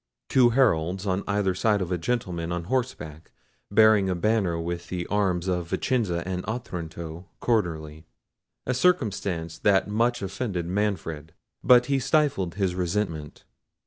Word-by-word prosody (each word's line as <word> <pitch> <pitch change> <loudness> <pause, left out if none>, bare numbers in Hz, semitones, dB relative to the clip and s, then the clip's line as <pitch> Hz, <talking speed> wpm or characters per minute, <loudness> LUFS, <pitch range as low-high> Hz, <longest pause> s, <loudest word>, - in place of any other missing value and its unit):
Two 125 -2 +5
heralds 95 -7 +2
on 95 -1 0
each 100 -2 0
side 105 -2 +3
of 90 -2 -3
a 90 - +1
gentleman 85 -5 -2
on 85 0 -2
horseback 90 - -3 0.4
bearing 110 -2 +5
a 90 - 0
banner 95 -3 +1
with 85 +1 -4
the 90 -1 -3
arms 95 -3 +1
of 90 -2 -1
Vicenza 95 -10 -1
and 90 -1 -3
Otranto 85 -6 -6
quarterly—a 80 +2 -4
circumstance 100 - 0
that 100 -2 +3
much 115 +2 0
offended 95 -3 -3
Manfred—but 95 +4 0
he 135 +1 +1
stifled 135 - +1
his 95 -3 0
resentment. 90 -4 -3
95 Hz, 130 wpm, -26 LUFS, 85-110 Hz, 0.4 s, Two